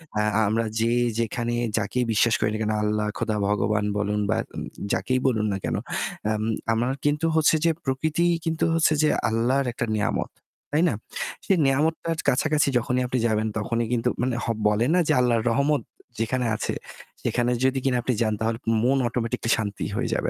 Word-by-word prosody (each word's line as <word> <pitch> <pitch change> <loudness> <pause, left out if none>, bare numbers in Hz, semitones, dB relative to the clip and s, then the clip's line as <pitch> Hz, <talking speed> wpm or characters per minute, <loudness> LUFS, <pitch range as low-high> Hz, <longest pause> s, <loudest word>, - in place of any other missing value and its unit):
অ্যা 105 - +2 0.2
আমরা 115 +2 +1
যে 115 +1 +2 0.3
যেখানে 120 +1 -1 0.2
যাকেই 115 +4 0
বিশ্বাস 110 +2 +3
করি 105 - +2
না - - -1
কেন, 110 0 0
আল্লাহ, 105 0 0
খোদা, 110 -2 -1
ভগবান 105 0 +1
বলুন 105 0 0
বা - - +2 0.2
উম - - -4 0.3
যাকেই 130 0 0
বলুন 110 -4 +1
না - - -1
কেন, - - -1 0.6
আম 110 0 -1 0.3
আমরা 120 +3 0 0.2
কিন্তু 145 +2 +1
হচ্ছে 160 0 +4
যে 165 - +5
প্রকৃতিই 160 +6 +1
কিন্তু 165 0 0
হচ্ছে 160 -1 +3
যে 150 - +4 0.2
আল্লাহর 125 +5 +1
একটা 120 - -2
নেয়ামত। 105 - -1 0.4
তাই 155 - +3
না? - - -1 0.5
সেই 195 - +3
নেয়ামতটার 160 +4 +1
কাছাকাছি 150 +3 +2
যখনই 125 +1 0
আপনি 125 0 -1
যাবেন 110 -1 0
তখনই 115 +1 -1
কিন্তু 120 +1 +1
মানে 125 -1 0
হ - - -4 0.2
বলে 105 +3 +2
না 180 - +4
যে 155 - +3
আল্লাহর 120 -3 +2
রহমত 140 +5 +2 0.4
যেখানে 125 +2 0
আছে - - -2 0.5
সেখানে 120 0 0
যদি 130 0 +2
কিনা 130 -2 +2
আপনি 125 - 0
যান 110 -1 +2
তাহলে 115 0 0 0.3
মন 135 +3 +3
automatically 115 -1 -2
শান্তি 105 -3 -3
হয়ে - - -1
যাবে। - - -1
120 Hz, 180 wpm, -25 LUFS, 110-135 Hz, 0.6 s, যে